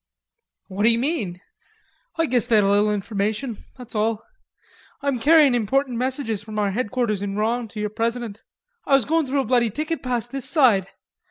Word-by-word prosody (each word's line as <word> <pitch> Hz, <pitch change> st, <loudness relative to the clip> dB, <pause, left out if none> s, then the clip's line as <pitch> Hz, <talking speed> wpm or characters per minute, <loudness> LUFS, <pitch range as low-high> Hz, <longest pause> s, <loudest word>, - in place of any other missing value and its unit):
"What 195 Hz, +1 st, -6 dB
d'you 230 Hz, +2 st, +4 dB
mean?" 235 Hz, -, -2 dB, 0.8 s
"Oi 330 Hz, -, +4 dB
guess 245 Hz, -4 st, +1 dB
they 235 Hz, -, +3 dB
had 210 Hz, -, +5 dB
a 200 Hz, -, +3 dB
little 205 Hz, +1 st, +3 dB
information... 210 Hz, +3 st, -2 dB, 0.2 s
that's 250 Hz, -2 st, -11 dB
all. 220 Hz, 0 st, 0 dB, 0.8 s
Oi'm 280 Hz, -3 st, 0 dB
carryin' 300 Hz, 0 st, +5 dB
important 245 Hz, +3 st, 0 dB
messages 255 Hz, -5 st, -1 dB
from 215 Hz, 0 st, -8 dB
our 205 Hz, -1 st, +1 dB
headquarters 225 Hz, -1 st, -1 dB
in 200 Hz, -1 st, -3 dB
Rouen 230 Hz, +3 st, -1 dB
to 215 Hz, 0 st, -9 dB
your 210 Hz, 0 st, -2 dB
president. 230 Hz, -1 st, -3 dB, 0.5 s
Oi -, -, +3 dB
was 270 Hz, -5 st, +4 dB
goin' 320 Hz, -1 st, +1 dB
through 275 Hz, +1 st, +1 dB
a -, -, -4 dB
bloody 240 Hz, -2 st, +2 dB
thicket 305 Hz, +7 st, -3 dB
past 240 Hz, -2 st, -2 dB
this 270 Hz, -2 st, -4 dB
side. 235 Hz, -, +4 dB
235 Hz, 180 wpm, -23 LUFS, 210-265 Hz, 0.8 s, had